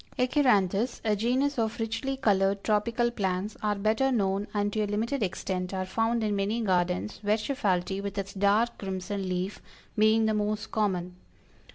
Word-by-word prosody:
ACHYRANTHES, 245 -5 +2
a 215 -1 +3
genus 255 +6 +1
of 220 0 -1
richly 230 +5 -2
colored 195 -5 +2
tropical 230 +3 +1
plants, 195 -1 -2
are 210 -1 +1
better 220 +6 +1
known, 200 -3 0
and 205 -1 -1
to 215 - 0
a 210 - 0
limited 230 +6 -1
extent 185 -1 -2
are 185 0 -2
found 225 +4 0
in 210 -1 0
many 200 +4 0
gardens, 180 -1 0
Verschaffelti, 205 -4 0
with 200 0 -5
its 195 0 -3
dark 205 +4 +2
crimson 190 0 -4
leaf, 185 +2 -3 0.3
being 220 +1 +4
the 220 - +2
most 210 +1 -2
common. 180 -4 -1
210 Hz, 160 wpm, -28 LUFS, 195-225 Hz, 0.3 s, being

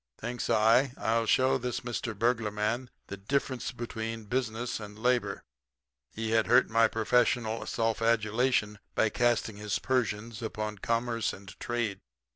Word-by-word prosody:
Thinks 120 -1 -4
I, 115 +4 +4
I'll 115 0 +1
show 130 +3 +3
this 125 0 -3
Mr. 120 -3 -4
Burglar 115 0 +1
Man 110 +4 -2 0.2
the 100 - -7
difference 130 +5 -1
between 115 -2 -5
business 120 0 -2
and 105 -1 -9
labor. 115 -3 0 0.7
He 110 0 -2
had 115 -1 +3
hurt 120 +2 +7
some - - -18
of - - -15
my 115 0 +5
professional 115 0 +1
self 115 -1 0
adulation 115 -1 +1 0.2
by 110 - +3
casting 120 -2 +1
his 105 -5 -1
Persians 115 +1 -1
upon 105 -2 -4
commerce 115 0 0
and 95 -1 -11
trade. 120 -5 -2
115 Hz, 150 wpm, -29 LUFS, 105-120 Hz, 0.7 s, hurt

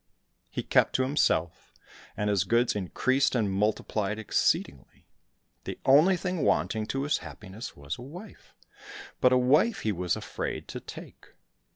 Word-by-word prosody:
He - - -4
kept - - +3
to 130 - +3
himself, 130 - 0 0.5
and 105 - -1
his 100 -2 +2
goods 115 +4 +2
increased 130 +8 +1
and 105 -5 +1
multiplied 105 0 -1
exceedingly; 70 - -1 0.6
the - - -5
only 155 +8 +6
thing 180 -1 -3
wanting 110 -4 +1
to 135 +3 -2
his 145 +1 0
happiness 105 +3 -9
was 70 +6 -6
a - - -8
wife, 175 - -12 0.6
but 125 - +4
a 130 - +5
wife 150 - +3
he 110 - 0
was 90 -3 -1
afraid - - -5
to - - -5
take. - - -12
115 Hz, 150 wpm, -28 LUFS, 100-140 Hz, 0.6 s, only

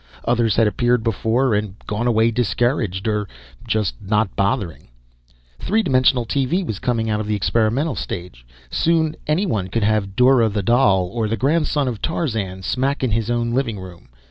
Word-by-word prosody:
Others 115 -2 +2
had 115 - +4
appeared 120 +2 +1
before, 115 +3 +1
and 105 -2 -1
gone 105 +3 -2
away 115 -1 +3
discouraged 115 -4 0
or 105 -1 -1 0.4
just 110 - 0
not 105 0 0
bothering. 100 -4 -1 0.7
3 220 +3 +1
dimensional 130 - +3
TV 145 - 0
was 105 - -4
coming 115 -2 -1
out 105 -1 0
of 110 - -4
the 105 - 0
experimental 115 - +1
stage. 85 - -6 0.3
Soon 160 -1 +1
anyone 150 - 0
could 110 +3 -1
have 100 -2 0
Dora 125 -2 +4
the 100 -1 -2
Doll 100 -5 +3
or 115 -2 -1
the 115 +2 -2
Grandson 145 0 +1
of 115 -5 -4
Tarzan 110 - -2
smack 135 +7 -1
in 125 - +1
his 110 +1 -1
own 120 0 0
living 120 -5 -1
room. 90 -2 -11
115 Hz, 170 wpm, -20 LUFS, 105-130 Hz, 0.7 s, had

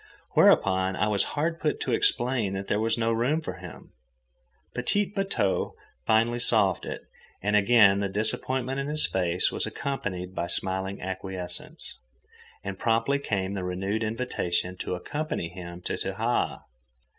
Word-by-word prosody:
Whereupon 95 0 +4
I 105 - +1
was 100 -2 +3
hard 165 +3 0
put 150 - 0
to 130 - -1
explain 120 -3 +2
that 95 0 -4
there 105 - +1
was 115 +1 +1
no 115 0 +1
room 120 +8 +2
for 160 - -6
him. - - -11 0.8
"Petit 205 +12 +1
bateau" 195 - -1 0.3
finally 115 +2 +3
solved 105 -6 +2
it, - - -5 0.4
and 105 +1 +2
again 105 -1 +6
the 100 -1 0
disappointment 130 +6 0
in 140 - -2
his 150 +1 +2
face 90 -2 +1
was - - -2
accompanied 95 -10 -4
by 85 -2 -2
smiling 95 +2 -2
acquiescence, 95 -1 -5 0.6
and 95 -1 -5
promptly 115 +5 +2
came 100 -7 -1
the 95 -2 -3
renewed 95 +4 -2
invitation 110 -6 -1
to 90 - -3
accompany 145 - -3
him 85 -1 -8
to - - -3
Tahaa. - - -1
105 Hz, 145 wpm, -27 LUFS, 95-125 Hz, 0.8 s, again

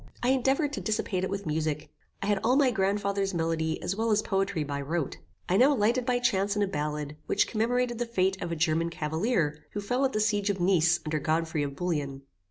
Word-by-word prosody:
I 245 - +3
endeavoured 270 +3 +2
to - - -3
dissipate 210 -4 -1
it 190 - -1
with 200 0 -4
music. 155 -1 -2 0.3
I - - -1
had 205 -1 +2
all 245 +3 +3
my 275 -3 +4
grand 200 -1 +1
father's 200 -1 -1
melody 165 -1 0
as 195 - -1
well 225 +2 0
as 215 0 +3
poetry 195 -4 0
by 140 -1 -3
rote. 155 +1 -2 0.3
I 185 - +2
now 275 +5 +5
lighted 235 +3 +1
by 250 -1 +3
chance 200 -4 +1
on 205 - +3
a - - +1
ballad, 150 -3 -3
which 205 - +3
commemorated 240 +1 0
the 240 - -1
fate 190 -4 0
of 170 - -3
a - - -1
German 165 +1 +1
Cavalier, 160 0 -1
who 205 - -2
fell 245 +6 -1
at 270 - +1
the 215 - 0
siege 210 -1 +1
of 195 -2 -1
Nice 175 -2 +3
under 155 0 -1
Godfrey 160 0 0
of 140 -1 -3
Bouillon. 145 -5 -2
195 Hz, 225 wpm, -28 LUFS, 160-220 Hz, 0.3 s, now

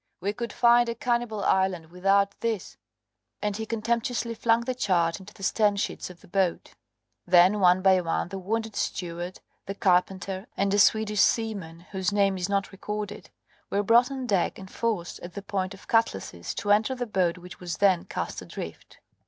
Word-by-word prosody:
We 200 +3 -2
could 235 +2 -5
find 240 0 +4
a 230 - -2
cannibal 235 -3 -1
island 185 -4 +1
without 195 +2 +2
this," 225 -4 -3 0.6
and 210 -1 -2
he 220 +1 -4
contemptuously 235 +1 -1
flung 230 0 +2
the 255 +2 -2
chart 175 -7 +1
into 195 +2 -12
the 200 - -13
stern 205 +1 +2
sheets 200 - -3
of 180 -1 -13
the - - -17
boat. 185 -1 -1 0.5
Then, 180 +3 +6
one 185 0 +4
by 190 -1 +5
one, 165 0 -1
the 195 +1 -5
wounded 220 +3 -3
steward, 175 0 -3 0.3
the 195 - -4
carpenter, 190 +1 0
and 195 0 +1
a 205 - +3
Swedish 210 0 +4
seaman 200 -8 0
whose 190 -2 -1
name 200 -1 +2
is 185 +1 -3
not 200 0 0
recorded, 210 +1 -6 0.4
were 200 +1 0
brought 235 +4 +5
on 265 -2 -4
deck 195 -7 +1
and 190 -1 -11
forced, 215 -7 -2
at 175 - -9
the 200 - -6
point 195 -1 -3
of 195 - -17
cutlasses, 95 - 0
to 205 - -1
enter 215 +5 +3
the 245 -1 -3
boat, 185 -5 0
which 180 0 -11
was 175 -3 -5
then 190 -4 +3
cast - - -4
adrift. - - -9
200 Hz, 185 wpm, -27 LUFS, 185-220 Hz, 0.6 s, Then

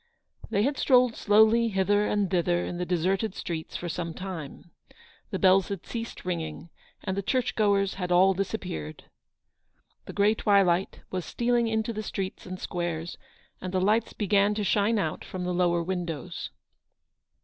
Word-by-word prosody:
They 200 - +1
had 280 +3 0
strolled 250 -3 +4
slowly 220 +2 +4
hither 205 0 +2
and 205 -1 +1
thither 175 -1 +1
in 175 - -4
the 180 - -2
deserted 185 +4 0
streets 160 -2 -5
for 175 - -5
some 170 -1 -4
time. 175 -3 -7 0.6
The - - -2
bells 190 -1 +4
had 200 -4 -5
ceased 230 -4 -6
ringing, 165 -2 -4 0.3
and 190 -2 -2
the 200 - -1
church 255 +5 0
goers 200 -2 +2
had 180 0 -2
all 185 +2 +5
dis 195 +1 -2
appeared. 80 - -5 1.0
The - - -8
grey 205 +1 +4
twilight 195 -4 +2
was 185 -1 -2
stealing 235 +6 +1
into 220 +1 -1
the 215 - -3
streets 195 -3 -5
and 185 0 -6
squares, 175 -1 -4 0.4
and 185 - -4
the 185 - +1
lights 210 +4 +2
began 205 0 +2
to 210 - -1
shine 210 +3 +2
out 160 -6 -2
from 185 -1 -6
the 180 0 -1
lower 175 -1 +2
windows. 175 -1 -4
190 Hz, 165 wpm, -27 LUFS, 175-210 Hz, 1.0 s, all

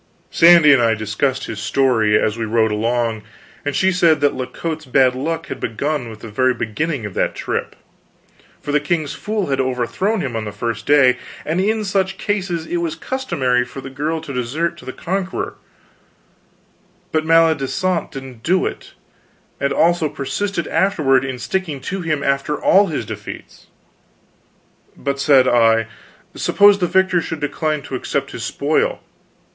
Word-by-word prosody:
Sandy 165 -3 +7
and 130 - +4
I 115 -1 +3
discussed 110 +6 -1
his 110 -2 -6
story, 115 -4 +2
as 110 - 0
we 115 - -3
rode 110 0 +1
along, 115 +1 0 0.4
and 145 -1 -2
she 190 +5 +3
said 170 -4 +3
that 145 0 +2
La 130 - -4
Cote's 160 -1 -5
bad 130 0 +3
luck 160 +6 -3
had - - -7
begun 135 +2 -2
with 110 -1 -11
the - - -8
very 130 +3 +2
beginning 125 +3 -2
of 105 - -6
that - - -1
trip; - - -3 0.8
for 145 - -5
the 150 - +3
king's 155 -1 -1
fool 210 -7 -3
had 135 0 +1
overthrown 130 - -1
him 125 -4 -4
on 110 - -2
the 105 - -5
first 115 +3 -4
day, 130 -4 +5 0.3
and 165 +4 0
in 215 +2 0
such 195 -1 0
cases 185 -5 -2
it 175 - -2
was 170 -2 -2
customary 130 - -1
for 125 +2 -9
the 135 0 -8
girl 150 +4 -2
to 145 -3 -7
desert 135 +7 -2
to - - -13
the 130 - -5
conqueror, 190 +6 -3 1.6
but 155 -1 +1
Maledisant 165 +2 +2
didn't 130 -4 -9
do 180 +8 +1
it; - - -6 0.6
and 140 - 0
also 170 -2 +2
persisted 170 +6 -3
afterward 150 -10 +2
in 130 -2 -4
sticking 160 +2 -3
to 195 +6 -4
him, 155 -4 -1
after 140 +2 0
all 200 +1 +4
his 155 -5 -3
defeats. - - -9 1.3
But, 140 0 -3
said 135 -2 +5
I, 115 -2 +4 0.5
suppose 205 0 +4
the 180 - +1
victor 190 -1 +2
should 165 - -5
decline 150 0 -2
to - - -10
accept 140 +2 -2
his 115 - -6
spoil? 145 +6 0
145 Hz, 165 wpm, -19 LUFS, 125-170 Hz, 1.6 s, Sandy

